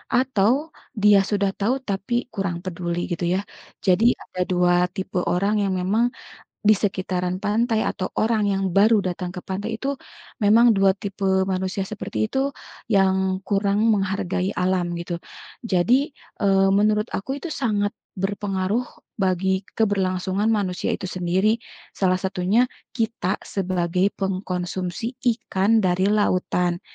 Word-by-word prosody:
atau 245 -5 +3 0.5
dia 205 -1 +7
sudah 200 -2 +1
tahu 215 +5 +2
tapi 195 +3 -3 0.2
kurang 195 -4 -2
peduli 175 -1 -3
gitu 175 +1 -2
ya. 185 - +1 0.5
Jadi 185 +4 +4 0.2
ada 180 - -6
2 180 0 +3 0.2
tipe 190 -2 -4 0.2
orang 200 +4 +1
yang 195 -1 0
memang, 210 +6 +2 0.6
di 215 - +9
sekitaran 185 -2 -1
pantai 220 +2 +1
atau 185 - -2
orang 220 -1 +2
yang 195 0 0
baru 215 +3 +5
datang 180 0 -3
ke 185 - -10
pantai 205 +4 -3
itu, 275 +4 -2 0.5
memang 225 +4 +6
2 195 -1 +4
tipe 190 -1 0
manusia 190 +1 -2
seperti 210 0 -6
itu, 265 +5 0 0.4
yang 190 -2 +2
kurang 200 +2 +1
menghargai 190 -1 -1
alam 180 -1 +1
gitu. 170 0 -5 0.4
Jadi, 235 - +2 0.3
eee, 195 -1 +4
menurut 210 +1 +3
aku 265 +8 -3
itu 325 +1 -5
sangat 205 -3 +1 0.2
berpengaruh 195 +2 -1 0.3
bagi 190 -1 0 0.2
keberlangsungan 195 -1 +1
manusia 195 -5 0
itu - - -2
sendiri, 185 +5 0 0.3
salah 185 -1 +2
satunya 190 +5 +1 0.3
kita 215 -4 -1
sebagai 185 0 0
pengkonsumsi 185 0 -3 0.3
ikan 200 +2 +1
dari 185 +2 +2
lautan. 180 -4 +1
195 Hz, 130 wpm, -23 LUFS, 185-210 Hz, 0.6 s, di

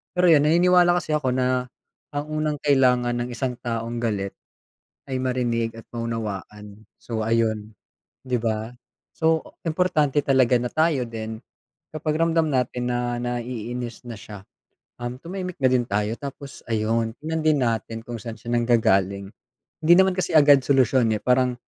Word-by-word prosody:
Pero 180 0 +4
yun 145 -2 +6
naniniwala 175 +2 +5
kasi 155 -3 -2
ako 130 -4 0
na 125 0 +1 0.5
ang 145 0 -3
unang 155 -1 -2
kailangan 125 -4 +3
ng 125 - -6
isang 125 0 -3
taong 115 0 -3
galit 100 -3 -2 0.7
ay 130 - -1
marinig 120 -3 -1
at 115 - -11
maunawaan. 105 -2 -5 0.2
So 115 -2 -4
ayun, 110 -2 0 0.5
di 125 -2 -1
ba? 110 0 -2 0.5
So, 160 0 +2 0.2
importante 155 -4 +1
talaga 130 -3 +3
na 125 - -3
tayo 155 -4 +2
din, 110 -1 -6 0.5
kapag 155 0 -2
ramdam 165 -1 +2
natin 125 -1 -1
na 120 0 -1
naiinis 120 0 -4
na 120 - -6
siya, 105 -2 -11 0.6
um, 120 +1 -4
tumahimik 180 +2 -6
na 130 - +1
din 125 -1 +2
tayo. 105 +2 0
Tapos 140 0 -8
ayun, 110 +1 0
tignan 160 +1 -3
din 155 -1 +3
natin 115 -2 -1
kung 120 -1 -6
saan 115 -1 -7
siya 120 +2 -5
nanggagaling. 100 -5 +2 0.6
Hindi 170 - +6
naman 190 -1 +4
kasi 185 -1 -1
agad 145 -3 +6
solusyon, 130 -4 +3
eh, 105 - -3
parang, 125 0 +2
125 Hz, 150 wpm, -24 LUFS, 115-145 Hz, 0.7 s, yun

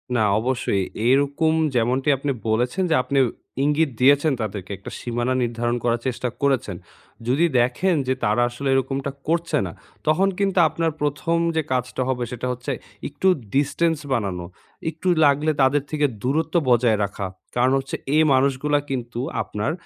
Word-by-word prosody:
না, 120 - +2 0.2
অবশ্যই। 120 -5 0 0.2
এইরকম 140 +4 +3 0.2
যেমনটি 125 +4 +1
আপনি 140 +2 -2 0.2
বলেছেন 125 +11 +1
যে - - +5
আপনি 140 +1 0 0.4
ইঙ্গিত 150 +2 +2
দিয়েছেন 145 +4 +5
তাদেরকে, 100 -3 -5
একটা 100 - -10
সীমানা 120 +1 -1
নির্ধারণ 120 0 -1
করার 120 -1 +1
চেষ্টা 125 0 -2
করেছেন। 135 -8 +1 0.5
যদি 140 +7 +3
দেখেন 125 +10 +2
যে 130 - +2
তারা 105 +3 +2
আসলে 120 +3 -5
এরকমটা 135 +1 -1 0.2
করছে 170 +1 +1
না, 90 - -5 0.4
তখন 155 +6 +3
কিন্তু 195 -2 +1
আপনার 165 +1 -1
প্রথম 150 +3 0 0.2
যে 160 - +2
কাজটা 125 0 -1
হবে 125 -2 -1
সেটা 125 +1 -4
হচ্ছে 125 +3 -4 0.4
একটু 145 +6 -2 0.3
distance 155 +3 +1
বানানো। 95 -7 -2 0.4
একটু 160 +3 -6 0.2
লাগলে 145 +2 +3
তাদের 135 +2 +3
থেকে 150 -1 +1 0.2
দূরত্ব 155 +6 0
বজায় 120 -2 +4
রাখা। 100 0 -3 0.3
কারণ 125 +1 +3
হচ্ছে 135 0 -5 0.2
এই 155 - +5
মানুষগুলা 140 +2 +2
কিন্তু 120 -3 -4 0.2
আপনার 105 +6 -2
130 Hz, 150 wpm, -23 LUFS, 120-150 Hz, 0.5 s, যে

